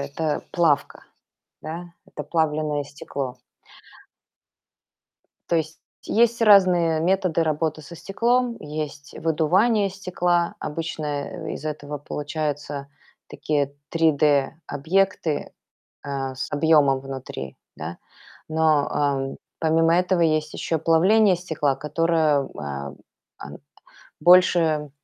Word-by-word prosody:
это 145 +2 -2
плавка, 165 -5 +1 0.6
да? 165 +3 -6 0.2
Это - - -7
плавленое 155 -2 0
стекло. 140 -2 -6 2.1
То 170 - +3
есть 160 0 -3 0.2
есть 235 +1 +2
разные 180 -6 +5
методы 180 -1 +1
работы 155 0 -1
со 170 +4 -11
стеклом: 235 +5 0
есть 150 -1 -6
выдувание 190 +7 +2
стекла, 180 -2 0
обычно, 155 0 -4 0.2
э, - - -6
из - - -9
этого 150 -1 -5
получаются 145 -1 -4 0.4
такие 145 -1 -2 0.2
3D 150 -4 +2
объекты, 165 +1 0 0.5
э, 135 -2 -3
с 130 - -5
объёмом 145 -3 +4
внутри, 130 - -7 0.2
да. 80 +3 -7 0.5
Но, 155 -2 +2
эм, 140 -2 -1 0.2
помимо 165 +1 +3
этого 180 0 +1
есть 155 -1 +1
ещё 165 - -1
плавление 185 +6 +4
стекла, 160 -5 -1
которое, 155 0 +1
э, - - -11 0.9
а, - - -8 0.7
больше 165 -3 +4
155 Hz, 100 wpm, -23 LUFS, 145-175 Hz, 2.1 s, разные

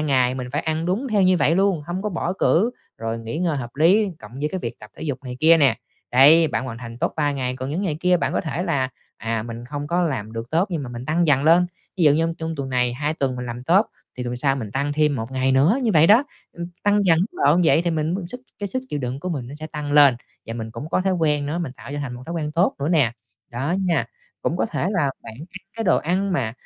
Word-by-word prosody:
ngày 130 -4 +2
mình 125 -1 -5
phải 150 - 0
ăn 160 +1 -2
đúng 220 +9 -1
theo 205 -2 +3
như 185 0 +4
vậy 155 +1 +3
luôn, 195 -5 +2
hông 180 +3 -3
có 210 - -1
bỏ 175 -1 -2
cữ, 195 +4 +2 0.3
rồi 115 0 -3
nghỉ 115 +7 -5
ngơi 170 -4 0
hợp 120 -3 -5
lý 190 +8 +4
cộng 110 +3 -13
với 150 - 0
cái 190 - -1
việc 115 - -5
tập 105 0 -13
thể - - -9
dục 140 -5 -2
này 125 -1 -6
kia 165 +1 +7
nè. 135 -7 +4 0.4
Đấy, 155 +5 +7
bạn 115 +2 -2
hoàn 115 -2 -6
thành 115 -1 -9
tốt - - -1
3 145 -2 +1
ngày, 130 -2 -2
còn 130 +2 -5
những 175 +6 -2
ngày 160 -7 -1
kia 180 0 +4
bạn - - -1
có - - +1
thể 165 +1 -3
là, 140 -8 0 0.3
à, 115 0 -2
mình 115 +1 -7
không 145 +3 -5
có 175 +3 +1
làm 125 -10 -2
được 115 +1 -6
tốt 175 +6 +1
nhưng 165 -4 -2
mà 130 - -6
mình 120 +1 -7
tăng 165 +2 +1
dần 140 -1 +3
lên. 170 +3 +5 0.3
Ví 175 - +2
dụ 145 - +7
như 165 +2 +1
trong 160 0 -3
tuần 135 -1 -4
này, 125 -1 +1
2 150 +5 -2
tuần 130 -4 -1
mình 125 0 -5
làm 120 +1 -6
tốt 190 - +4 0.3
thì 125 - -4
tuần 120 0 -3
sau 135 +1 +1
mình 110 -6 -5
tăng 140 +2 -1
thêm 150 -2 +2
1 115 +2 -5
ngày 130 0 +1
nữa, 155 - +4
như 230 - +2
vậy 160 +1 +6
đó, 230 +7 +6 0.3
ừ, 170 0 -6 0.2
tăng 205 0 +3
dần 165 -3 +4
mức 200 - -3
độ 165 +5 +5
vậy 160 - +4
thì 175 - 0
mình 160 +2 -1
mới 190 -2 -3
sức 250 +4 -8 0.2
cái 205 - -3
sức 260 +5 -3
chịu 145 - -3
đựng 130 +1 -4
của 185 - -4
mình 140 -8 -3
nó 140 - -8
sẽ 155 +1 -7
tăng 150 -2 -5
lên 140 -4 +7 0.3
và 115 - -5
mình 110 -1 -5
cũng 145 - -7
có - - +1
thói 190 0 +1
quen 150 -4 +1
nữa, 160 +4 -2
mình 155 -7 -4
tạo 140 - -12
cho 145 - -3
thành 130 -4 -4
một 125 - -9
thói 170 - -5
quen 150 -2 -3
tốt 175 +5 +2
nữa 140 - -1
nè, 145 -9 +3 0.4
đó 135 +9 -2
nha. 175 -2 +1 0.4
Cũng - - 0
có - - 0
thể - - -2
là 165 -9 +1
bạn 110 - -9 0.2
ăn 185 - -10
cái 225 - -2
đồ 185 - +4
ăn 185 +4 -1
mà 115 -10 -1
150 Hz, 290 wpm, -22 LUFS, 130-175 Hz, 0.4 s, kia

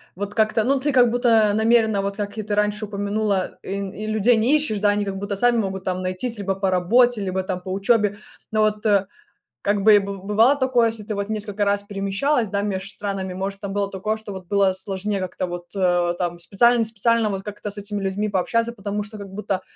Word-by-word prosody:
вот 205 +2 -5
как-то, 220 0 +2
ну, 270 +4 +2
ты 290 +3 0
как 250 -3 +5
будто 230 -4 +3
намеренно, 220 -1 +3
вот 200 +1 -3
как 205 +1 -4
и 215 - -3
ты 205 0 -2
раньше 210 +1 0
упомянула, 205 -1 -1
и - - -9
и 200 +2 -5
людей 220 +2 +3
не 245 +7 +3
ищешь, 290 -9 0
да, 205 0 +3
они 205 0 +1
как 195 -1 -4
будто 200 +1 -3
сами 240 +3 +3
могут 190 -3 -2
там 185 0 -2
найтись: 185 +6 -1
либо 195 -1 -2
по 195 -1 0
работе, 225 +5 +3
либо 190 -1 -1
там 185 -1 -4
по 185 - -6
учёбе. 205 +1 +2 0.3
Но 215 0 +2
вот, 215 0 0
э, 200 -2 +3 0.6
как 205 0 +1
бы, 215 -1 +8
и - - +7
бы 200 0 -5
бывало 215 +8 +3
такое, 255 -3 +3
если 225 -1 -4
ты 210 +1 -4
вот 200 +1 -3
несколько 210 -1 -2
раз 200 0 +1
перемещалась, 205 +5 -1
да, 200 0 -1
меж 195 -1 -3
странами, 195 -2 -4
может, 195 +2 -4
там 200 -1 -4
было 200 -1 -1
такое, 210 +3 -2
что 215 -2 -8
вот 185 -1 -8
было 200 -2 +3
сложнее 195 +1 -3
как-то 185 0 -3
вот, 175 0 -7
э, 175 -2 +2
там 175 -1 -3
специально, 235 +8 +3
не 225 - +2
специально 225 0 +1
вот 195 -1 -4
как-то 210 0 -6
с 205 - -4
этими 205 0 -4
людьми 195 +2 -1
пообщаться, 230 +5 0
потому 205 -1 -4
что 210 +1 -9
как 200 - -8
будто 195 -1 -3
205 Hz, 230 wpm, -22 LUFS, 195-220 Hz, 0.6 s, бы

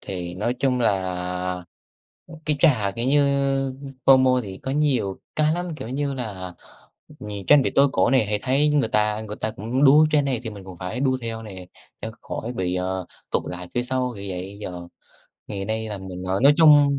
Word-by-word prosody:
thì 90 -2 -5
nói 120 +7 -1
chung 130 -2 +1
là, 90 -3 -1 0.6
ừm, 165 - -11
cái 150 - +1
trò, 120 -12 +4
kiểu 115 - -1
như, 145 +2 +4 0.8
FOMO 130 -1 +6
thì 95 -2 -8
có 130 - -3
nhiều 135 -9 +1 0.2
cái 155 0 +3
lắm, 175 -2 -4
kiểu 110 - -7
như 140 +2 -2
là 95 -8 -6 0.7
nh 105 - -7 0.2
canh 145 -2 +7
bị - - 0
tối 140 +1 +5
cổ - - +3
nè, 130 -5 +4
hay 105 0 0
thấy 135 +3 +2
người 145 -6 +2
ta 105 0 +1
người 105 -1 -7
ta 110 - -1
cũng 115 +6 -1
đu 150 +3 +7
trend 145 -2 +3
này 130 -4 -1
thì 115 - -5
mình 100 -3 -10
cũng 95 -2 -10
phải 95 +7 -4
đu 130 -1 +2
theo 115 -1 -4
nè, 95 -4 -9 0.4
cho 110 - -3
khỏi 120 - -5
bị, 90 -6 -2
ờ, 95 0 -2 0.2
tụt - - +1
lại 90 0 -6
phía 120 - +1
sau, 125 0 -1
kiểu 100 - -7
vậy. 95 +2 -6
Giờ 90 -3 -7 0.6
ngày 100 -2 -4
nay 110 +1 -2
là 105 - -4
mình, 95 -1 -7
à, - - 0
nói 140 +2 +7
chung 145 -3 +6
110 Hz, 210 wpm, -23 LUFS, 95-135 Hz, 0.8 s, canh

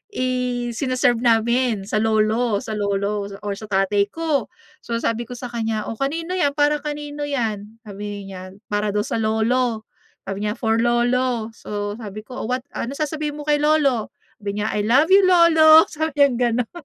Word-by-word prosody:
isine-serve 250 -1 0
namin 235 -1 +2
sa 215 - 0
lolo 220 0 +1
sa 220 - -6
lolo, 200 0 -1 0.2
or 205 - -2
sa 215 - -9
tatay 200 +1 +1
ko. 310 -8 -1 0.3
So, 235 - -4
sabi 230 +1 -1
ko 245 - -7
sa 250 +1 -6
kanya, 220 -2 -2
"O, 225 - -7
kanino 330 +6 -2
yan, 285 -5 +2
para 295 0 +2
kanino 295 -1 -4
yan?", 225 -5 -3
sabihin 205 -1 -7
niya 185 -1 -8 0.3
para 205 0 0
daw 210 - +1
sa 225 - -2
lolo, 225 +1 0 0.4
sabi 195 +2 -4
niya 210 - 0
"For 225 -1 0
lolo". 240 -1 +1
So, 205 -1 -5
sabi 215 -1 -7
ko, 255 0 -7
"O - - -4
what 250 +1 -2
ano, 250 +4 -4
sasabihin 305 -1 -3
mo 295 - -5
kay 295 -1 +3
Lolo", 290 -7 +2 0.3
sabi 200 -1 -4
niya, 215 - -1
"I 210 0 -1
love 285 +8 +4
you 390 0 +7
lolo", 320 -3 +7
sabi 315 +1 -2
niyang 265 -4 +4 0.2
gano'n, 245 -1 -2
235 Hz, 180 wpm, -21 LUFS, 215-280 Hz, 0.4 s, you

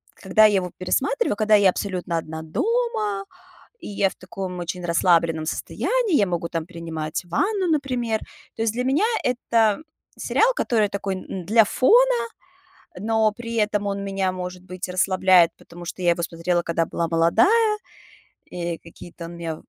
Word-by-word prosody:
когда 205 +3 +4
я 210 -2 +4
его 180 -2 -1
пересматриваю, 280 - 0
когда 215 0 +4
я 200 -2 +5
абсолютно 180 -3 -2
одна 160 0 -5
дома, 215 - -1 0.6
и - - -8
я 200 -1 +1
в - - -13
таком 185 -1 -6
очень 175 +1 -5
расслабленном 170 -2 +2
состоянии, 485 - -1
я 205 - +3
могу 170 -2 -2
там 165 -1 -3
принимать 165 -1 -5
ванну, 385 - 0
например. 250 -7 0 0.4
То 225 - -2
есть 225 - +1
для 250 +1 -1
меня 280 +10 +2 0.2
это 230 -4 +2 0.4
сериал, - - +2
который 220 - +1
такой 195 -1 -3 0.3
для 220 +4 +5
фона, 475 - +4 0.8
но 220 +2 +2
при 230 +1 -6
этом 210 -1 0
он 200 0 -2
меня, 195 -1 -1
может 180 0 -6
быть, 185 0 -7
расслабляет, 185 -1 +4
потому 175 0 -12
что 170 - -7
я 175 - +4
его 170 0 0
смотрела, 170 +1 -1
когда 165 -1 0
была 165 +1 -2
молодая, 395 - +3 0.7
и 170 -1 -4
какие-то 170 +1 -11
он 170 - -8
мне 165 -2 -5
195 Hz, 160 wpm, -23 LUFS, 170-225 Hz, 0.8 s, я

